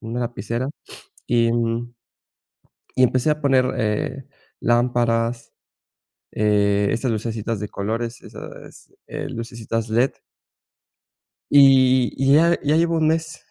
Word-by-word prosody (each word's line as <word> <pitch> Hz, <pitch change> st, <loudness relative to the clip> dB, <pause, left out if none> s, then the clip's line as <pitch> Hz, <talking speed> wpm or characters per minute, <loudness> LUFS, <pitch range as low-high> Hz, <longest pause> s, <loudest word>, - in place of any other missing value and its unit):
una 115 Hz, +2 st, -5 dB
lapicera 120 Hz, +2 st, -3 dB, 0.6 s
y 115 Hz, -1 st, +2 dB
un 120 Hz, +1 st, -2 dB, 1.0 s
y 130 Hz, -, +4 dB
empecé 130 Hz, +4 st, +2 dB
a 150 Hz, 0 st, 0 dB
poner, 135 Hz, -2 st, +3 dB
eh, 110 Hz, +4 st, -2 dB, 0.4 s
lámparas, 120 Hz, -1 st, 0 dB, 0.8 s
eh, 100 Hz, -1 st, +1 dB
esas 120 Hz, +2 st, -1 dB
lucecitas 110 Hz, -1 st, -3 dB
de 105 Hz, -, -4 dB
colores, 115 Hz, +4 st, -4 dB
esas, -, -, -12 dB
eh, -, -, -5 dB
lucecitas 115 Hz, -1 st, -5 dB
led. 120 Hz, +4 st, +2 dB, 1.4 s
Y 130 Hz, -3 st, +5 dB
y 135 Hz, +1 st, +3 dB
ya, 170 Hz, +3 st, +4 dB
ya 150 Hz, +1 st, +2 dB
llevo 165 Hz, +1 st, +2 dB
un 155 Hz, -1 st, +2 dB
mes 160 Hz, 0 st, -2 dB
120 Hz, 115 wpm, -21 LUFS, 115-135 Hz, 1.4 s, Y